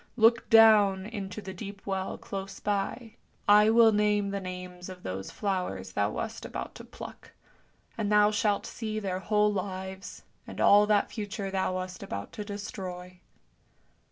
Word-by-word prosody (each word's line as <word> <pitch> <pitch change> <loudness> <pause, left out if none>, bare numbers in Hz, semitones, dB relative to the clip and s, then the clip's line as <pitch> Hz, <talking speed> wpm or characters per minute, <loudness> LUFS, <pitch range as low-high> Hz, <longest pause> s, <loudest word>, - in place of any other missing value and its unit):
Look 230 +1 +4
down 210 -4 +6
into 205 -2 -6
the 190 - -6
deep 200 +1 -9
well 190 -1 -3
close 195 -1 -7
by, 210 +3 -3 0.3
I 210 +1 +7
will 225 0 +6
name 210 -1 +2
the 200 - -2
names 180 -1 -7
of 180 -1 -10
those 95 +1 -5
flowers 180 - -3
thou 100 +2 0
wast 225 - -5
about - - -6
to - - -10
pluck, - - -11 0.7
and 210 -1 0
thou 210 0 +5
shalt 210 -1 +1
see 215 -2 -5
their 190 -3 -3
whole 210 +1 +2
lives, 190 0 -5 0.2
and - - -8
all 205 +1 +6
that 210 -1 +2
future 205 -2 -4
thou 190 -1 0
wast 185 0 -5
about 100 0 -6
to 210 - -6
destroy." 185 -3 -7
200 Hz, 155 wpm, -29 LUFS, 185-210 Hz, 0.7 s, I